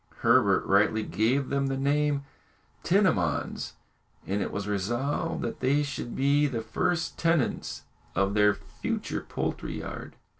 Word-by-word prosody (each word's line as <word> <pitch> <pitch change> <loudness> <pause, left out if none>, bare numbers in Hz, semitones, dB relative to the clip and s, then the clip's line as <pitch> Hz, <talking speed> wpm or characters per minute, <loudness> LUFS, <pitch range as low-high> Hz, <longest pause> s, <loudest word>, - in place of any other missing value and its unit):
Herbert - - +4
rightly 105 +2 +3
gave 125 +7 +1
them 140 0 +1
the 135 0 -1
name 145 +2 +2
of 140 - -5 0.6
tinamons, 150 - +1 0.5
and 100 +2 -1
it - - -2
was 100 0 -4
resolved 120 +8 -1
that 115 - -4
they 140 +3 +2
should 140 -4 -5
be 145 +2 +3
the 120 -5 -3
first 160 +10 -1
tenants 165 -5 0 0.3
of 100 0 +2
their 105 -1 +4
future - - -4
poultry - - -3
yard. - - -7
130 Hz, 140 wpm, -28 LUFS, 105-145 Hz, 0.6 s, Herbert